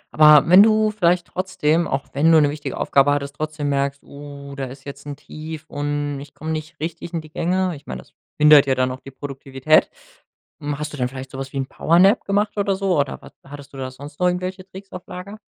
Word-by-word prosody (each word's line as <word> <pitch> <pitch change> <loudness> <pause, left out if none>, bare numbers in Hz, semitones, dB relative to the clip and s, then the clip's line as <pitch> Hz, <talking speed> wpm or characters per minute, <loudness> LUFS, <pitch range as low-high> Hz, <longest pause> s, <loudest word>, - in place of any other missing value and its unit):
Aber 150 -1 +7
wenn 185 +3 +8
du 215 0 +4
vielleicht 180 -4 +2
trotzdem 175 -3 0
auch 135 0 -2
wenn 155 +4 +3
du 160 - +7
'ne 145 -2 +3
wichtige 150 0 -6
Aufgabe 140 +1 +3
hattest, 140 0 -2
trotzdem 155 -1 -3
merkst: 140 0 -1
„Oh, 140 -1 -10
da 135 - -4
ist 135 +1 -11
jetzt 140 +1 -9
'n 145 - -5
Tief 155 +2 -9
und 145 -1 -3
ich 140 0 -12
komme 160 +1 -5
nicht 155 +1 -5
richtig 165 +2 -5
in 165 - -2
die 155 -1 -15
Gänge.“ 185 +1 0
Ich 145 +1 -15
meine, - - -6
das - - -28 0.2
behindert 150 -2 +7
ja 130 - +2
dann 130 0 0
auch 130 - -7
die 135 - -11
Produktivität. 135 +2 0 0.7
Hm, 145 0 -3
hast 150 0 -5
du - - -7
dann 125 - 0
vielleicht 130 +1 -9
so 135 - -7
was 135 0 -6
wie - - -4
'n 135 - -1
Powernap 185 +10 +3
gemacht 205 +2 0
oder 200 -1 +1
so? 190 -3 0
Oder 140 -1 -2
was - - -13
hattest 140 0 -12
du - - -10
da 130 -1 -4
sonst 145 +3 -12
noch 180 - +3
irgendwelche 185 +1 -3
Tricks 195 +1 -12
auf 180 - -9
Lager? 200 +3 -9
150 Hz, 235 wpm, -21 LUFS, 140-180 Hz, 0.7 s, wenn